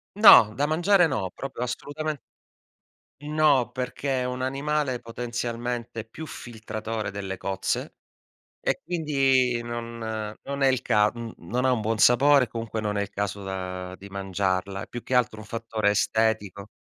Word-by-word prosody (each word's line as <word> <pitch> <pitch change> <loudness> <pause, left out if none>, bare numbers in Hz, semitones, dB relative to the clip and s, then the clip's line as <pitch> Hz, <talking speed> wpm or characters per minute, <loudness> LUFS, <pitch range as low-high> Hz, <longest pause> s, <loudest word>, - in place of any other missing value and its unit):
No, 125 - +9
da 145 +3 +1
mangiare 175 +3 +4
no, 105 -9 -2
proprio 135 -2 -6
assolutamen 145 +5 -3 1.1
No, 150 -5 +3
perché 130 +1 -2
è - - 0
un 125 0 -3
animale 135 -1 -1
potenzialmente 120 -1 -4
più 155 +8 -9
filtratore 110 -4 -5
delle 95 -1 -5
cozze, 95 0 -2 0.7
e - - -1
quindi 135 -7 +2
non 120 0 -5 0.5
non 140 0 -4
è 135 - +5
il 130 -2 +1
ca 105 0 +4
mhmm, 115 -1 -7
non 125 +9 -2
ha 130 - +4
un 115 -3 +1
buon 110 +1 0
sapore, 135 +4 +6
e - - -3
comunque 115 -1 -4
non 105 -1 -2
è - - +1
il 100 - -3
caso, 100 0 -3
uhm, 90 -1 -5
di 100 - -12
mangiarla. 95 0 -2
È - - -10
più 120 - -7
che 130 - -2
altro 115 -3 +2
un 110 - -9
fattore 115 -2 -1
estetico. 105 -2 0
120 Hz, 160 wpm, -26 LUFS, 105-135 Hz, 1.1 s, No